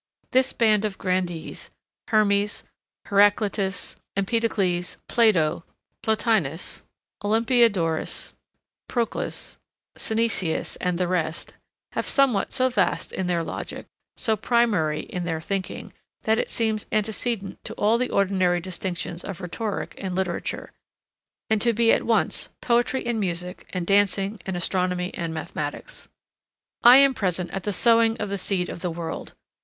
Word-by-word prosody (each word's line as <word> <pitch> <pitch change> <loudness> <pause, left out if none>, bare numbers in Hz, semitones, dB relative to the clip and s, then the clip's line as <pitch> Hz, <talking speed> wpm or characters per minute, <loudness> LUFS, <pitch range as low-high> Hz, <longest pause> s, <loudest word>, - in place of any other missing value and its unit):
This 260 0 +3
band 215 -3 +3
of 210 -3 -2
grandees, 180 -3 -3 0.4
Hermes, 205 -2 +2 0.4
Heraclitus, 200 -1 +2 0.2
Empedocles, 195 -4 0
Plato, 175 -9 +3 0.4
Plotinus, 215 - 0 0.4
Olympiodorus, 220 -6 +2 0.5
Proclus, 235 -2 -2 0.4
Synesius 220 -7 -1
and 180 -1 0
the 180 0 0
rest, 170 -2 -2 0.4
have - - -2
somewhat 260 -8 +3
so 260 -1 +3
vast 255 - 0
in 190 - -2
their 170 -2 +1
logic, - - -6 0.3
so 220 - +1
primary 205 -9 +1
in 180 -1 -5
their 165 -2 -2
thinking, 185 +3 -4 0.3
that 220 +1 +2
it - - -1
seems 220 -2 -1
antecedent 215 -1 -2
to - - -5
all 220 +3 +2
the 250 - 0
ordinary 185 -3 +2
distinctions 175 -1 -4
of 195 -2 -6
rhetoric 195 +3 -4
and 185 -2 -3
literature, 185 -2 -3 0.8
and 220 -1 +1
to 235 -1 +3
be 230 +1 +4
at - - +3
once 230 - +2
poetry 240 +2 +1
and 235 -2 0
music 180 -2 -3
and 180 -2 -3
dancing 200 +1 +2
and 190 -2 -2
astronomy 180 0 0
and 170 -2 -3
mathematics. 150 -2 -6 0.7
I 245 +2 +9
am 275 -1 +6
present 180 -5 -1
at 195 - -5
the 205 - 0
sowing 230 +2 +4
of 210 - -3
the 200 0 -2
seed 185 -1 0
of - - -6
the 180 - -1
world. 165 0 -6
200 Hz, 135 wpm, -25 LUFS, 180-225 Hz, 0.8 s, I